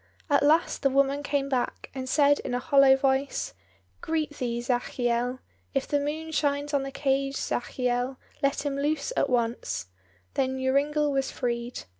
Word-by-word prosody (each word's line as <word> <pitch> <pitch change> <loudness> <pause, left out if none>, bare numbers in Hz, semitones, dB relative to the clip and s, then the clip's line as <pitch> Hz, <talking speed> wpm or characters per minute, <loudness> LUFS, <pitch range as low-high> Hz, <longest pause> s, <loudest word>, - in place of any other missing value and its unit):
At 285 - +5
last 310 +4 +3
the 275 - +3
woman 275 +1 +2
came 285 -1 -1
back, 260 -3 -2
and 260 -1 -5
said 290 0 +4
in 245 - -3
a - - 0
hollow 270 +1 +6
voice, 270 - 0 0.5
"Greet 315 -2 -1
thee, 235 -2 -2
Zachiel. 245 0 -1 0.3
If 270 - 0
the 290 - +1
moon 310 +3 -3
shines 290 -1 0
on 280 - +3
the 275 - -4
cage, 275 0 0
Zachiel, 250 +1 -1 0.2
let 275 +1 0
him 280 -1 -1
loose 300 - -1
at 280 - +1
once." 230 - -1 0.4
Then 265 0 0
Joringel 290 +3 +2
was 270 -1 0
freed. 240 -1 -3
275 Hz, 160 wpm, -27 LUFS, 250-285 Hz, 0.5 s, hollow